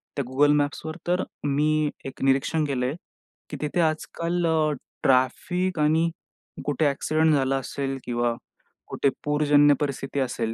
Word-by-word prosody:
त्या 140 Hz, -, -2 dB
Google 145 Hz, +2 st, +4 dB
मॅप्सवर 145 Hz, +2 st, -2 dB
तर 180 Hz, +1 st, +1 dB, 0.2 s
मी 150 Hz, +2 st, +2 dB, 0.2 s
एक 135 Hz, -, -8 dB
निरीक्षण 135 Hz, +4 st, +2 dB
केलंय, 130 Hz, -1 st, -1 dB, 0.5 s
की -, -, -5 dB
तिथे 150 Hz, +3 st, -1 dB
आजकाल 170 Hz, +2 st, -1 dB, 0.6 s
ट्रॅफिक 175 Hz, +8 st, +1 dB
आणि 160 Hz, +2 st, +3 dB, 0.6 s
कुठे 145 Hz, +2 st, 0 dB
ॲक्सिडेंट 155 Hz, +3 st, +2 dB
झाला 135 Hz, -1 st, +2 dB
असेल 135 Hz, 0 st, -3 dB
किंवा 120 Hz, -1 st, 0 dB, 0.5 s
कुठे 140 Hz, -, +1 dB
पूरजन्य 145 Hz, 0 st, +4 dB
परिस्थिती 140 Hz, -1 st, -3 dB
असेल 120 Hz, -3 st, -1 dB
145 Hz, 125 wpm, -25 LUFS, 135-155 Hz, 0.6 s, Google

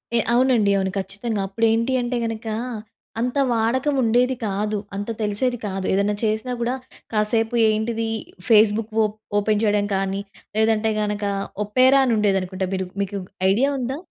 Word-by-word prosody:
ఏ -, -, +4 dB
అవునండి. 240 Hz, -5 st, +3 dB
అవును. 190 Hz, -1 st, 0 dB
ఖచ్చితంగా. 200 Hz, +3 st, -3 dB
అప్పుడు 225 Hz, +4 st, 0 dB
ఏంటి 230 Hz, +3 st, +1 dB
అంటే 240 Hz, 0 st, -2 dB
గనక, 225 Hz, 0 st, -5 dB, 0.7 s
అంత 250 Hz, +4 st, -1 dB
వాడకం 245 Hz, +5 st, +1 dB
ఉండేది 245 Hz, +3 st, +3 dB
కాదు. 210 Hz, +2 st, -1 dB, 0.2 s
అంత 205 Hz, +3 st, -4 dB
తెలిసేది 215 Hz, +4 st, 0 dB
కాదు. 190 Hz, -1 st, -3 dB
ఏదైనా 200 Hz, +2 st, +1 dB
చేసినా 220 Hz, +3 st, 0 dB
కూడా 240 Hz, +2 st, 0 dB, 0.4 s
కాసేపు 225 Hz, +2 st, +1 dB
ఏంటిది 225 Hz, +1 st, -1 dB, 0.4 s
ఫేస్‌బుక్ 215 Hz, 0 st, +4 dB
ఓప్ 210 Hz, 0 st, -2 dB, 0.2 s
ఓపెన్ 210 Hz, +1 st, +1 dB
చేయడం 205 Hz, -1 st, +2 dB
కానీ 195 Hz, +1 st, -1 dB, 0.4 s
లేదంటే 220 Hz, 0 st, +2 dB
గనుక, 210 Hz, 0 st, -2 dB, 0.4 s
ఒపెరా 255 Hz, +6 st, +5 dB
అని 240 Hz, -, +2 dB
ఉండేది 200 Hz, -2 st, +2 dB
అనుకుంటా. 185 Hz, +1 st, -3 dB
మీరు 190 Hz, -1 st, -3 dB, 0.2 s
మీకు 200 Hz, 0 st, -4 dB, 0.3 s
ఐడియా 260 Hz, +8 st, +2 dB
ఉందా? 260 Hz, +3 st, -3 dB
220 Hz, 150 wpm, -22 LUFS, 205-235 Hz, 0.7 s, ఒపెరా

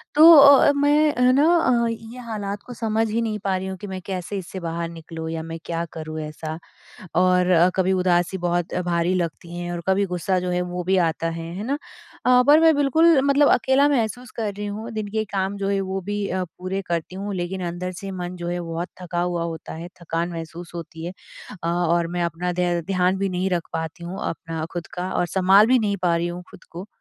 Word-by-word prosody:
तो 290 Hz, -3 st, +9 dB
मैं 290 Hz, +1 st, +3 dB
है 250 Hz, 0 st, +5 dB
न 280 Hz, +3 st, +4 dB
अ, 260 Hz, -9 st, +3 dB
ये 230 Hz, +2 st, -7 dB
हालात 205 Hz, -3 st, -4 dB
को 250 Hz, -, -8 dB
समझ 225 Hz, -1 st, 0 dB
ही 230 Hz, +2 st, 0 dB
नहीं 215 Hz, -2 st, -2 dB
पा 195 Hz, -1 st, +1 dB
रही 190 Hz, +1 st, -4 dB
हूँ 190 Hz, 0 st, -5 dB
कि 205 Hz, -, -8 dB
मैं 190 Hz, -1 st, -5 dB
कैसे 190 Hz, +1 st, -4 dB
इससे 190 Hz, 0 st, -6 dB
बाहर 170 Hz, 0 st, -3 dB
निकलूँ 165 Hz, -1 st, -7 dB
या 165 Hz, 0 st, -3 dB
मैं 165 Hz, 0 st, -6 dB
क्या 165 Hz, 0 st, -2 dB
करूँ 155 Hz, 0 st, -6 dB
ऐसा? 155 Hz, +1 st, -6 dB, 0.6 s
और 180 Hz, 0 st, +3 dB
अ, 175 Hz, 0 st, +5 dB
कभी 190 Hz, 0 st, +2 dB
उदासी 180 Hz, 0 st, +1 dB
बहुत 175 Hz, -1 st, -1 dB
भारी 170 Hz, +1 st, +1 dB
लगती 170 Hz, -1 st, -4 dB
है, 175 Hz, 0 st, -4 dB
और 170 Hz, -, -4 dB
कभी 190 Hz, +1 st, +3 dB
गुस्सा 180 Hz, 0 st, -1 dB
जो 180 Hz, 0 st, -3 dB
है 180 Hz, 0 st, 0 dB
वो 180 Hz, 0 st, -4 dB
भी 190 Hz, +2 st, +2 dB
आता 165 Hz, +1 st, -3 dB
है, 165 Hz, 0 st, -5 dB
है 200 Hz, -, -5 dB
न? -, -, -1 dB, 0.5 s
अ, 250 Hz, 0 st, +6 dB
पर 295 Hz, +2 st, +8 dB
मैं 325 Hz, 0 st, +6 dB
बिल्कुल 305 Hz, +2 st, +4 dB
मतलब 280 Hz, +1 st, +4 dB
अकेला 265 Hz, +3 st, +3 dB
महसूस 245 Hz, -2 st, -1 dB
कर 215 Hz, -3 st, -2 dB
रही 205 Hz, +1 st, -5 dB
हूँ 215 Hz, +3 st, -6 dB
दिन 215 Hz, -2 st, -4 dB
के 220 Hz, 0 st, -1 dB
काम 195 Hz, 0 st, -1 dB
जो 200 Hz, 0 st, -2 dB
है 200 Hz, -1 st, +1 dB
वो 190 Hz, 0 st, -3 dB
भी 205 Hz, +1 st, -3 dB
पूरे 185 Hz, +1 st, -4 dB
करती 170 Hz, +1 st, -3 dB
हूँ 200 Hz, +1 st, -4 dB
लेकिन 180 Hz, +1 st, -3 dB
अंदर 175 Hz, +2 st, -4 dB
से 195 Hz, -1 st, -5 dB
मन 175 Hz, +1 st, -5 dB
जो 175 Hz, -1 st, -5 dB
है 175 Hz, 0 st, -2 dB
बहुत 170 Hz, +1 st, -4 dB
थका 175 Hz, -1 st, -2 dB
हुआ 175 Hz, -1 st, -1 dB
होता 165 Hz, -1 st, -6 dB
है, 165 Hz, +2 st, -7 dB
थकान 170 Hz, 0 st, -2 dB
महसूस 165 Hz, +1 st, -7 dB
होती 165 Hz, -1 st, -7 dB
है। 175 Hz, -, -5 dB, 0.5 s
अ, -, -, -1 dB
और 170 Hz, 0 st, +1 dB
मैं 175 Hz, +1 st, -2 dB
अपना 170 Hz, +2 st, -2 dB
ध्यान 180 Hz, +2 st, +1 dB
भी 195 Hz, 0 st, -1 dB
नहीं 185 Hz, +1 st, -1 dB
रख 175 Hz, -2 st, -1 dB
पाती 160 Hz, +1 st, -4 dB
हूँ 180 Hz, +3 st, -6 dB
अपना 165 Hz, -1 st, -5 dB
खुद 175 Hz, -1 st, -5 dB
का 180 Hz, +1 st, -3 dB
और -, -, +1 dB
सँभाल 190 Hz, +4 st, +5 dB
भी 255 Hz, -, +5 dB
नहीं 205 Hz, -3 st, 0 dB
पा 170 Hz, -1 st, +3 dB
रही 170 Hz, +1 st, -1 dB
हूँ 175 Hz, +1 st, -6 dB
खुद -, -, -15 dB
को। 180 Hz, +4 st, -8 dB
185 Hz, 225 wpm, -23 LUFS, 170-210 Hz, 0.6 s, तो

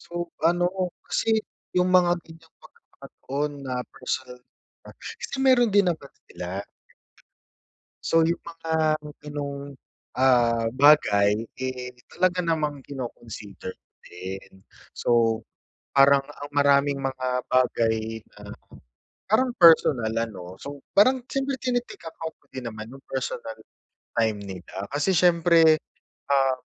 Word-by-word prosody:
So 175 Hz, 0 st, -5 dB, 0.2 s
ano, 175 Hz, +2 st, +1 dB, 0.2 s
kasi 220 Hz, -1 st, +1 dB, 0.3 s
yung 180 Hz, 0 st, +2 dB
mga 175 Hz, -1 st, +4 dB
ganiyang 160 Hz, -1 st, -17 dB
pagkakataon 145 Hz, +3 st, -6 dB
na 130 Hz, -1 st, -3 dB, 0.2 s
personal 125 Hz, 0 st, -4 dB, 0.6 s
approach -, -, -9 dB
kasi -, -, -4 dB
mayro'n 250 Hz, -3 st, +5 dB
din 200 Hz, -1 st, +4 dB
naman 155 Hz, -5 st, -4 dB, 0.2 s
sila. 90 Hz, 0 st, -7 dB, 1.6 s
So -, -, -2 dB
yung 170 Hz, +1 st, -1 dB
mga 165 Hz, -1 st, -6 dB, 0.5 s
ganong, 140 Hz, -1 st, -6 dB, 0.5 s
ah, 120 Hz, -3 st, +3 dB
bagay, 110 Hz, -8 st, +5 dB, 0.2 s
eh, 130 Hz, -1 st, -5 dB, 0.2 s
talaga 180 Hz, 0 st, +1 dB
namang 150 Hz, -4 st, -1 dB
kino-consider 115 Hz, -8 st, -7 dB, 0.3 s
din. 95 Hz, +1 st, -9 dB, 0.3 s
So 115 Hz, -2 st, +2 dB, 0.6 s
parang 140 Hz, 0 st, +6 dB
ang 145 Hz, 0 st, -10 dB
maraming 140 Hz, 0 st, +3 dB
mga 130 Hz, -1 st, -3 dB, 0.2 s
bagay 115 Hz, -3 st, +1 dB, 0.2 s
na, -, -, -12 dB, 0.9 s
parang 250 Hz, +5 st, +3 dB
personal 140 Hz, -9 st, +6 dB
ano 105 Hz, -6 st, -4 dB
so 145 Hz, 0 st, -7 dB, 0.2 s
parang 255 Hz, +6 st, +5 dB
siyempre 270 Hz, 0 st, -2 dB
tine-take 245 Hz, -1 st, -2 dB
account 160 Hz, 0 st, -7 dB
ko -, -, -34 dB
din 125 Hz, -3 st, -5 dB
naman 110 Hz, -1 st, -8 dB
yung 135 Hz, -, -12 dB
personal 120 Hz, -4 st, -4 dB, 0.6 s
time 110 Hz, -2 st, +2 dB
nila 95 Hz, 0 st, -7 dB
kasi 150 Hz, +7 st, +1 dB
siyempre, 170 Hz, -2 st, +5 dB, 0.5 s
ah, 135 Hz, -2 st, +3 dB
140 Hz, 115 wpm, -25 LUFS, 115-170 Hz, 1.6 s, parang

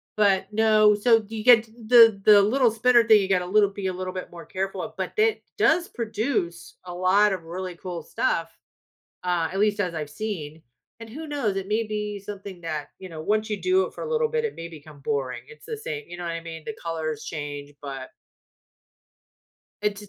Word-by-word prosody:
but 195 Hz, -2 st, +3 dB
no, 215 Hz, -1 st, +5 dB
so 225 Hz, 0 st, +3 dB
you 220 Hz, -1 st, -6 dB
get 235 Hz, -2 st, +7 dB
t 220 Hz, -, -22 dB
the 225 Hz, -4 st, +7 dB
the 205 Hz, -1 st, +8 dB
little 235 Hz, +4 st, +3 dB
spinner 240 Hz, +2 st, +4 dB
thing, 220 Hz, -2 st, +7 dB
you 190 Hz, -, -1 dB
gotta 180 Hz, -2 st, +1 dB
little 205 Hz, +2 st, +3 dB
be 195 Hz, -1 st, -4 dB
a 185 Hz, -, -1 dB
little 185 Hz, 0 st, -5 dB
bit 185 Hz, -, -6 dB
more 170 Hz, -1 st, -10 dB
careful 190 Hz, +1 st, -3 dB
of, -, -, -6 dB
but -, -, -3 dB
it 440 Hz, 0 st, +2 dB
does 355 Hz, -2 st, +3 dB
produce 220 Hz, -, -3 dB
a 180 Hz, -, -7 dB
lot 190 Hz, +3 st, +3 dB
of 185 Hz, -3 st, -5 dB
really 180 Hz, +1 st, -6 dB
cool 175 Hz, -1 st, -6 dB
stuff, 165 Hz, +2 st, -1 dB, 0.8 s
uh, 175 Hz, -2 st, +1 dB
at 195 Hz, -, -3 dB
least 210 Hz, 0 st, +2 dB
as 180 Hz, -4 st, -1 dB
I've 150 Hz, -2 st, -4 dB
seen, 160 Hz, -5 st, -5 dB, 0.4 s
and 225 Hz, -1 st, -9 dB
who 310 Hz, +7 st, -7 dB
knows? 275 Hz, -10 st, -1 dB
It 195 Hz, -1 st, -3 dB
may 215 Hz, +3 st, +1 dB
be 210 Hz, -1 st, -4 dB
something 200 Hz, -2 st, -8 dB
that, 155 Hz, -3 st, -5 dB
you 185 Hz, -, -8 dB
know, 160 Hz, -3 st, -8 dB
once 215 Hz, +6 st, 0 dB
you 210 Hz, -, -2 dB
do 370 Hz, +1 st, +3 dB
it -, -, -11 dB
for -, -, -7 dB
a 470 Hz, -, -5 dB
little 470 Hz, 0 st, +2 dB
bit, 465 Hz, 0 st, -1 dB
it 455 Hz, -, -2 dB
may 165 Hz, -, -7 dB
become 155 Hz, -2 st, -13 dB
boring, 135 Hz, -3 st, -2 dB
it's 465 Hz, -, -15 dB
the 455 Hz, -, -4 dB
same 445 Hz, 0 st, -5 dB
you -, -, -9 dB
know 175 Hz, -, -7 dB
what 170 Hz, -, -2 dB
I 165 Hz, -, -4 dB
mean? 165 Hz, -1 st, -8 dB
The 225 Hz, -, -5 dB
colors 160 Hz, -2 st, -4 dB
change, 145 Hz, -2 st, -6 dB
but 135 Hz, -2 st, -7 dB, 1.7 s
It 210 Hz, -1 st, +1 dB
d -, -, -8 dB
200 Hz, 220 wpm, -25 LUFS, 170-225 Hz, 1.7 s, the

